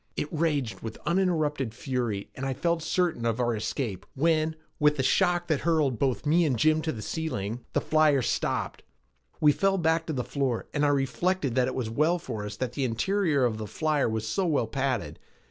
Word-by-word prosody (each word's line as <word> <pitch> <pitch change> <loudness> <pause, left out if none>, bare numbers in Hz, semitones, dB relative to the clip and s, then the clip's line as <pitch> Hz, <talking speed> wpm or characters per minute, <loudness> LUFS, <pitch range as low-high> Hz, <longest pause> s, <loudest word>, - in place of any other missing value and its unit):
It - - -2
raged 150 -7 0
with 110 -1 -7
uninterrupted 155 - 0
fury 120 -6 -3
and 130 - -7
I 135 -1 -1
felt 170 +4 0
certain 170 -5 0
of 115 0 0
our 120 -2 +1
escape 105 -3 -3
when, 160 +2 +2 0.2
with 150 -1 +4
a 130 - +1
shock 175 +3 +2
which 155 -4 +1
hurled 155 -8 +1
both 135 -3 0
Jim 150 - +1
and 130 -7 +1
me 155 0 +4
to 160 +1 -1
the 110 -6 -6
ceiling, 120 -8 -3
the - - +2
flyer 155 -4 +3
stopped. - - -1 0.6
We 150 - +6
fell 195 +5 +1
back 165 -1 +1
to 160 - -2
the 125 -3 -1
floor 135 -4 -1
and 145 - 0
I 145 - +4
reflected 145 +2 0
that 125 0 +2
it 130 - -3
was 120 -4 -2
well 155 +8 +2
for 110 -11 -5
us 105 0 -5
that 125 +2 -3
the 140 - -2
interior 145 - +1
of 110 -3 -1
the 110 - -4
flyer 150 +3 0
was 110 0 -2
so 185 - 0
well 145 -7 +2
padded. 130 +3 -2
140 Hz, 205 wpm, -27 LUFS, 120-160 Hz, 0.6 s, We